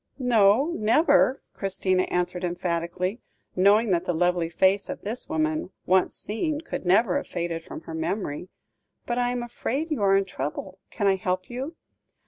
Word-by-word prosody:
"No, 245 +2 +4
never," 275 +4 +3
Christina 185 -1 0
answered 180 0 -1
emphatically, 175 +3 -2 0.3
knowing 205 +4 +4
that 175 0 +1
the 175 - -1
lovely 175 0 +1
face 190 +3 +2
of - - -5
this 230 +7 -2
woman, 315 -4 -1 0.2
once 185 0 +2
seen, 295 +8 -3
could 325 - -6
never 190 +1 +4
have - - -4
faded 170 -2 -3
from - - -8
her 165 - -9
memory; 170 0 -3 0.6
"but, 240 0 -1
I 245 0 +1
am 245 0 -2
afraid 270 +6 -3
you 295 - -1
are 195 -1 +5
in 195 - +1
trouble; 185 +3 -5
can 205 - -3
I 195 -1 +4
help 185 +3 -2
you? 270 +7 -5
195 Hz, 165 wpm, -26 LUFS, 180-240 Hz, 0.6 s, are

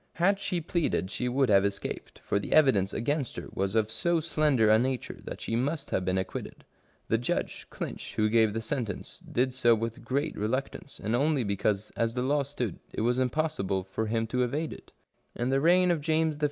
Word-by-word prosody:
Had 195 +4 +2
she 190 -3 -1
pleaded 155 - -1
she 125 +3 -1
would 130 0 +2
have 100 -1 +6
escaped, 100 -1 -4
for 100 - +1
the - - -3
evidence 125 -11 +5
against 140 +2 -1
her - - -6
was 95 +2 -1
of 110 -1 +2
so 170 +8 +1
slender 150 -7 +2
a 110 +1 +6
nature 130 0 -2
that - - -7
she 115 - -2
must 140 +5 -1
have 95 - +1
been 95 +1 0
acquitted. 95 0 -5 0.4
The 115 - +2
judge. 120 - -2
Clinch, - - -6
who 110 - +3
gave 110 -1 +4
the 115 +1 -3
sentence, 110 -3 -4
did 125 +1 +1
so 120 -2 +4
with 115 +1 -4
great 140 +4 -1
reluctance, 130 +6 -3
and 110 +3 -1
only 140 0 +2
because, 100 0 -1
as 115 +1 0
the 125 - 0
law 145 +2 +2
stood, 130 -8 -3
it - - -3
was 120 +3 +2
impossible 125 -8 0
for 95 +4 -3
him 115 +1 0
to 125 +3 -1
evade 145 +6 -1
it - - -14 0.4
In 120 +1 -1
the 135 +1 +2
reign 180 +3 +5
of 165 -3 0
James 160 0 +1
I. - - -14
125 Hz, 205 wpm, -29 LUFS, 110-145 Hz, 0.4 s, have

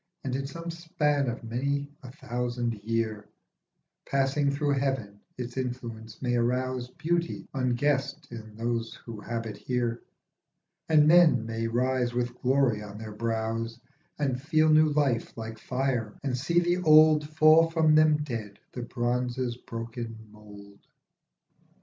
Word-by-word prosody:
And, 130 -1 -2
in 135 0 -2
some 165 +4 -6
span 150 -5 0
of 115 - -6
many 140 +5 -2
a 130 - -10
thousand 120 -1 -3
year, 110 -2 -2 0.8
Passing 140 +1 +1
through 145 +1 0
heaven 130 -7 -1 0.2
its 125 0 -6
influence 120 -3 -5
may 120 -1 +1
arouse 125 +1 -1
Beauty 170 +5 -2
unguessed 140 +3 0
in 110 -2 -9
those 115 0 -2
who 115 -3 -9
habit 115 -2 -4
here, 120 -2 -2 0.9
And 150 -2 +6
men 155 -8 +6
may 115 0 -2
rise 125 +1 0
with 120 0 -2
glory 130 -4 +2
on 105 -1 -9
their 110 0 -7
brows 115 +1 -2 0.4
And 135 -4 -1
feel 155 +2 +3
new 155 0 +6
life 145 -7 0
like 110 -1 -6
fire, 125 -3 -2
and 135 -3 -1
see 145 +7 +2
the 175 +1 +1
old 155 -3 +6
Fall 155 +1 +6
from 160 -2 +3
them 155 -1 +4
dead, 110 -7 -5
the 125 - -6
bronze's 120 0 -1
broken 115 -1 -7
mould. 100 -1 -14
125 Hz, 135 wpm, -28 LUFS, 115-145 Hz, 0.9 s, And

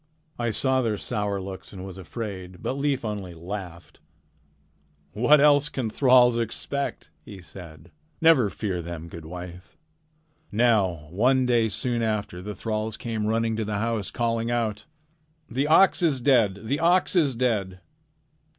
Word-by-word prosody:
I 120 -1 0
saw 130 +4 +1
their 110 -4 -1
sour 105 -3 -2
looks 95 0 -8
and 95 -1 -8
was 95 -1 -9
afraid, 95 -2 -7
but - - -1
Leif 140 -2 -1
only 100 -5 -5
laughed: 90 0 -8 1.1
"'What 125 +8 +4
else 145 0 +5
can 125 -7 -3
thralls 125 -2 +5
expect?' 140 +5 -3
he 100 - -11
said. 85 -3 -12 0.3
'Never 160 -10 +5
fear 95 -4 -3
them, 85 -1 -7
good 80 -1 -10
wife.' 90 - -9 0.7
"Now 105 -8 +2
one 125 +7 +3
day 120 -2 +2
soon 120 +3 -1
after 105 -4 -2
that 100 - -8
the 105 - -5
thralls 110 -1 -3
came 110 -3 -3
running 115 0 0
to 110 - -1
the 105 -1 -2
house 110 -2 -1
calling 115 -1 -1
out: 115 -3 -1 0.7
"'The 135 +5 0
ox 180 +5 +5
is 155 -6 +2
dead! 115 -7 +3
The 135 +6 -1
ox 175 +3 +3
is 145 -8 +3
dead!' 105 -7 -1
110 Hz, 150 wpm, -25 LUFS, 95-125 Hz, 1.1 s, else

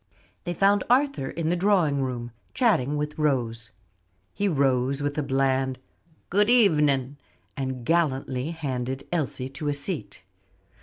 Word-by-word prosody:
They 175 0 -3
found 200 +2 +3
Arthur 270 - +2
in 160 +1 -2
the 175 - +2
drawing 175 -7 +2
room, 120 -2 -3 0.2
chatting 150 - +2
with 150 +1 -4
Rose. 120 -6 0 0.6
He 205 - 0
rose 135 -3 +1
with 145 0 -1
a - - +1
bland, 135 -1 0 0.5
"Good 205 +4 +3
evening," 150 - +3 0.4
and 130 -3 -4
gallantly 135 -4 0
handed 135 -4 -4
Elsie 135 -5 -2
to 140 +3 -6
a 145 - 0
seat. 145 - -5
145 Hz, 135 wpm, -25 LUFS, 130-170 Hz, 0.6 s, found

